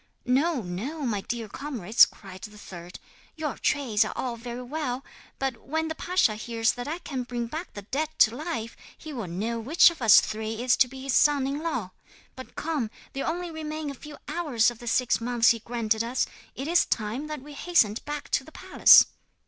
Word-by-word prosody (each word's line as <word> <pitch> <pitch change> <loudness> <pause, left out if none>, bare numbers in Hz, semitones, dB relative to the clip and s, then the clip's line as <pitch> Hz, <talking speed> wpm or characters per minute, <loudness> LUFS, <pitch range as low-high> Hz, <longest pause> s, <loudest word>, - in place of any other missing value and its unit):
'"No, 270 +1 +1
no, 220 - -5
my 215 -6 -1
dear 230 +1 -4
comrades," 235 -4 +3
cried 190 -2 -12
the 210 -1 -10
third, 180 -3 -10 0.4
"your 310 -3 -3
trades 235 -7 +2
are 215 - -4
all 245 -2 -3
very 240 +1 -7
well; 265 -1 -4 0.3
but 265 -3 -2
when 320 +6 -3
the - - -2
pasha 350 -8 +1
hears 225 +1 0
that 245 +2 -7
I 320 +3 -3
can 275 -7 -5
bring 245 -1 -4
back 315 +9 -6
the 205 - -7
dead 290 +9 -2
to 220 +2 +5
life 285 -7 -4 0.2
he 310 -1 -9
will 230 -8 -5
know 215 +7 -3
which 300 +9 +5
of 330 - -12
us 225 -3 +8
three 220 +1 -4
is 250 0 +4
to 260 - +5
be 265 +1 -10
his 275 -1 -2
son 285 -1 +4
in 280 +2 -2
law. 250 - -3 0.4
But 260 - -11
come, 300 -9 -2 0.2
there 275 - -3
only 345 +1 -3
remain 310 -1 -5
a - - -7
few 295 +3 -11
hours 260 -10 +1
of 235 - -13
the 240 - -10
six 245 0 +1
months 240 0 +3
he 230 - -1
granted 225 -1 -1
us. 245 +2 0 0.3
It 270 - -5
is 345 +1 +4
time 230 +7 -2
that 305 -3 -6
we 295 0 -11
hastened 275 -9 +2
back 295 0 -6
to - - +1
the 315 - -14
palace." - - +7
250 Hz, 205 wpm, -26 LUFS, 225-300 Hz, 0.4 s, us